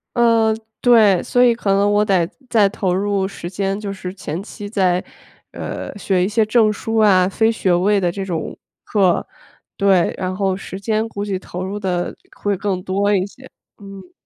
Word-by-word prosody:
嗯， 230 -2 +3 0.2
对， 220 -6 +5
所 245 - +2
以 245 -1 +5
可 230 -3 -4
能 200 +1 +3
我 205 0 +3
得 185 -5 +2 0.2
再 215 -4 +4
投 190 -2 -1
入 195 0 0
时 185 -3 -7
间， 195 +1 -2
就 205 -2 -5
是 185 -1 -7
前 180 -3 -5
期 205 0 -9
再， 185 -4 +1 0.5
呃， - - -6
学 190 -2 +1
一 - - 0
些 220 +2 +2
证 215 -1 +3
书 225 +2 -3
啊、 190 -4 +4
非 220 +3 +2
学 190 -5 0
位 200 +3 +3
的 175 -2 0
这 195 +1 -5
种 170 -4 -4 0.3
课。 190 -5 +2 0.5
对， 195 -4 +3
然 185 0 -3
后 190 -1 0
时 190 - -8
间 220 +2 -1
估 205 -2 -5
计 195 -2 -2
投 180 -1 -7
入 200 +2 -4
得 180 -3 -2 0.2
会 200 -2 -1
更 195 -2 -2
多 200 +2 +1
一 185 -1 +1
些， 255 +6 -14 0.3
嗯。 195 -2 -12
200 Hz, 200 characters per minute, -19 LUFS, 185-210 Hz, 0.5 s, 对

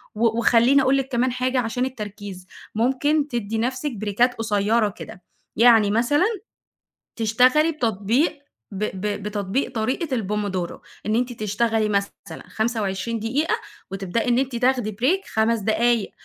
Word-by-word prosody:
و 225 +1 +1
وخلّيني 240 +4 +4
أقول 270 +1 +3
لِك 270 -1 -1
كمان 250 +1 +1
حاجة 255 +1 0
عشان 245 +1 -1
التركيز، 205 -6 -7 0.3
ممكن 280 +6 +1
تدّي 225 -5 -3
نفْسِك 255 +5 -1
بريكات 215 +5 +1
قصيّرة 215 0 +1
كده، 205 -2 -11 0.3
يعني 225 -3 +5
مثلًا، 245 - +2 0.9
تشتغلي 255 +8 +3
بتطبيق، 235 - 0 0.3
ب 200 +1 -4 0.2
ب 205 -1 -3
بتطبيق 205 +4 -2
طريقة 255 +6 -1
الPomodoro، 200 -4 -3 0.3
إن 215 - 0
أنتِ 245 +1 0
تشتغلي 215 0 0
مثلًا 200 -1 -3
25 220 -1 -2
دقيقة، 260 +9 0 0.4
وتبدئي 195 +5 -2
إن 240 - +3
أنتِ 265 -2 -2
تاخدي 245 -2 +1
Break 280 - 0
5 220 +1 +2
دقايق، 220 +1 +1
230 Hz, 135 wpm, -23 LUFS, 210-255 Hz, 0.9 s, يعني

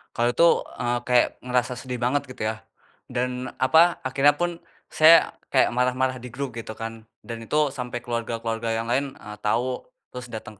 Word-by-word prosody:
Kalau 120 +1 +2
itu, 165 +7 +4 0.3
eee, 120 0 0
kayak 125 -1 +5
ngerasa 125 0 0
sedih 125 0 -6
banget 125 +4 +1
gitu 125 -4 -5
ya, 110 0 -3 0.5
dan 125 0 -2
apa? 160 +7 +5
Akhirnya 140 +3 +3
pun 175 0 -2 0.3
saya 160 +2 +7 0.2
kayak - - +3
marah-marah 125 +1 0
di 125 - -8
grup 130 +1 -5
gitu 110 -1 -7
kan, 115 0 -7 0.2
dan 115 -1 -6
itu 150 +4 +1
sampai 125 -3 -4
keluarga-keluarga 115 -1 -3
yang 115 - -2
lain, 135 +3 -1
eee, 105 0 -10
tau, 125 +4 -1 0.2
terus 125 -1 -7
dateng 110 -1 -7
125 Hz, 170 wpm, -24 LUFS, 115-130 Hz, 0.5 s, saya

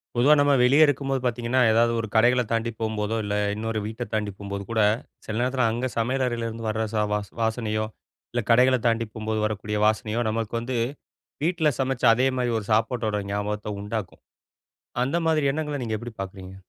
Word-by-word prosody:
பொதுவா 130 +5 +5
நம்ம 145 0 +4
வெளியே 135 +5 +6
இருக்கும்போது 135 -1 0
பாத்தீங்கன்னா, 120 +1 0
ஏதாவது 115 +1 +4
ஒரு 110 - -2
கடைகள 125 +3 +5
தாண்டி 115 0 0
போம்போதோ, 110 0 -1
இல்ல 105 0 -2 0.2
இன்னொரு 110 0 -2
வீட்ட 110 +3 -4
தாண்டி 105 -1 -1
போம்போது 100 0 -5
கூட, 110 -1 +2 0.4
சில 105 - -4
நேரத்தில 125 -1 +1
அங்க 120 +3 -1
சமையல் 130 +4 +1
அறையிலேருந்து 115 -2 -3
வர 110 +1 -1
ச - - -3 0.2
வ 105 - +1 0.2
வாசனையோ, 110 -1 0 0.5
இல்ல 120 -1 -1
கடைகளைத் 125 +1 +4
தாண்டி 115 0 +1
போம்போது 110 0 -2
வரக்கூடிய 105 0 -2
வாசனையோ, 110 +1 0
நமக்கு 110 0 -3
வந்து 120 +1 -3 0.7
வீட்டில 165 -2 +2
சமைச்ச 130 -1 -1
அதேமாரி 125 0 +1
ஒரு 105 - -7
சாப்பாட்டோட 110 -2 +1
ஞாபகத்த 105 0 -3
உண்டாக்கும். 105 -1 -5 0.8
அந்த 135 +6 -1
மாதிரி 155 -3 +2
எண்ணங்கள 150 -1 -3
நீங்க 110 -2 -2
எப்படி 120 +2 -7
பாக்குறீங்க? 95 -1 -7
115 Hz, 165 wpm, -25 LUFS, 110-125 Hz, 0.8 s, வெளியே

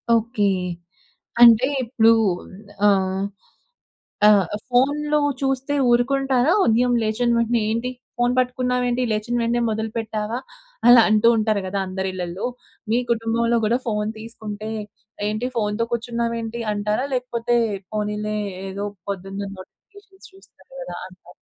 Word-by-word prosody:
Okay. 230 -1 0 1.0
అంటే 235 0 +8 0.2
ఇప్పుడు 230 -2 +4 0.8
ఆహ్, 190 -1 +2 1.0
ఆ - - +9 0.4
ఫోన్‌లో 295 +4 +2 0.2
చూస్తే 270 +1 -1 0.2
ఊరుకుంటారా 265 +3 +2
ఉదయం 245 +2 +3
లేచిన 220 +3 0
వెంటనే 235 0 +1
ఏంటి 230 +3 -1 0.3
ఫోన్ 245 0 +2
పట్టుకున్నావేంటి 250 0 0
లేచిన 215 +3 -2
వెంటనే 235 +1 +1
మొదలు 220 0 -2
పెట్టావా? 220 0 -3 0.5
అలా 240 -1 +9
అంటూ 215 +1 +5
ఉంటారు 215 -2 +1
గదా 190 +2 -2
అందరిళ్ళల్లో. 185 0 -4 0.4
మీ 230 - +3
కుటుంబంలో 230 +1 +1
కూడా 230 +3 +2
ఫోన్ 210 -1 -1
తీసుకుంటే, 220 -1 -7 0.6
ఏంటి 215 +4 -2
ఫోన్‌తో 215 +1 0
కూర్చున్నావు 235 0 -2
ఏంటి 230 +1 -5
అంటారా? 210 +5 -1
లేకపోతే 240 -1 -1 0.4
పోనీలే 210 0 -2 0.3
ఏదో 200 +2 -4 0.2
పొద్దున్న 195 0 -5 0.2
నోటిఫికేషన్ 395 - -16
చూస్తారు 390 +5 -21
గదా! - - -7
అంటారా? - - -18
230 Hz, 115 wpm, -22 LUFS, 210-245 Hz, 1.0 s, ఆ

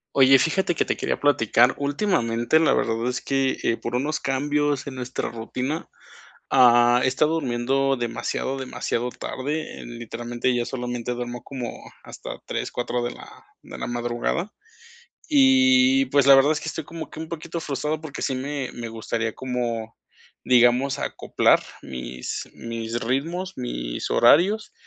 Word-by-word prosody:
Oye, 135 0 +7
fíjate 170 +4 +1
que, - - +2
te - - -2
quería - - -2
platicar 125 -3 +4
últimamente, 140 - +1
la 160 - +3
verdad 115 +1 0
es 125 0 -2
que, 135 -1 0
eh, 115 - +1
por 120 - -4
unos 145 +5 -1
cambios 145 +1 0
en 140 - -7
nuestra 125 0 -4
rutina, 125 +6 -4 0.6
ah, 120 -1 +6
he - - +2
estado 150 +4 +2
durmiendo 135 -1 0
demasiado, 120 +2 -3
demasiado 125 -2 -2
tarde, 145 +5 -5
literalmente 120 +1 -3
ya 120 -1 -1
solamente 125 -1 -4
duermo 120 0 -5
como 130 -3 -5 0.3
hasta - - -9
3 - - -3
4 120 0 -2
de 120 - -2
la - - -12 0.4
de - - -10
la - - -4
madrugada, 120 - -2 0.8
y 265 -1 +5
pues, 140 - +3
la 135 - +10
verdad 140 +3 +5
es 155 - -2
que, - - -6
estoy 160 -1 -4
como 165 +1 -8
que - - -10
un 160 0 -6
poquito 170 +1 -5
frustrado, 150 +1 -2
porque 155 -3 -7
sí 130 - -1
me 135 0 -3
me 120 - -6
gustaría 115 0 -3
como, 120 -3 -3 0.5
digamos, 125 +3 +4
acoplar - - +2 0.2
mis 65 -1 -6
mis 115 0 -4
ritmos, 165 +10 -2
mis - - -4
horarios, 185 - +4
130 Hz, 150 wpm, -24 LUFS, 120-150 Hz, 0.8 s, la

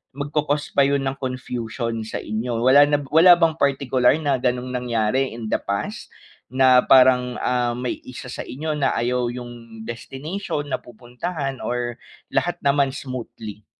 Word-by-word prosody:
magco-cause 145 +1 -2
pa 140 -1 +4
yun 140 -1 +1
ng 135 0 -3
confusion 120 -3 -4
sa - - -4
inyo. 115 +2 -2
Wala 140 +3 +7
na 145 - +2
b 140 - -9
wala 175 +3 +8
bang 165 -2 +1
partikular 135 -2 +2
na 145 -4 0
ganong 125 0 -1
nangyari 125 0 0
in 115 -2 -6
the - - +2
past, 100 0 -4 0.4
na 130 0 +5
parang, 125 -1 +5
ah, 125 -1 0
may 125 0 -3
isa 125 0 -8
sa - - -6
inyo 155 +5 -4
na 135 - +1
ayaw 125 +1 0
yung 120 -2 -9
destination 145 - -5
na - - -1
pupuntahan 130 +4 -6
or 120 -1 -3 0.3
lahat 175 -1 0
naman 140 -1 +3
smoothly? 115 -6 -7
125 Hz, 155 wpm, -22 LUFS, 120-140 Hz, 0.4 s, wala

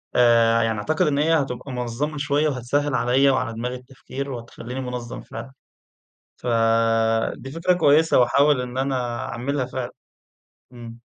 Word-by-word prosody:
آآ، 115 -1 +4
يعني 115 -1 0
أعتقد 155 - 0
إن 140 - +1
هي 155 +3 +2
هتبقى 135 -3 -2
منظّمة 125 +5 -3
شوية 145 +1 +1
وهتسهل 140 +1 -1
عليَّ 130 +3 +3
وعلى 130 -3 0
دماغي 125 +3 -4
التفكير 135 +2 -8
وهتخليني 120 +1 -7
منظَّم 125 -2 -6
فعلًا، 115 +4 -9 0.9
فدي 115 +1 +1
فكرة 165 +4 +1
كويسة 160 -3 +4
وهاحاول 140 +3 +4
إن 125 0 -5
أنا 125 -3 -1
أعملها 130 +2 -2
فعلًا، 130 -1 -5 0.8
إمم. 120 -1 -10
125 Hz, 135 wpm, -23 LUFS, 120-140 Hz, 0.9 s, آآ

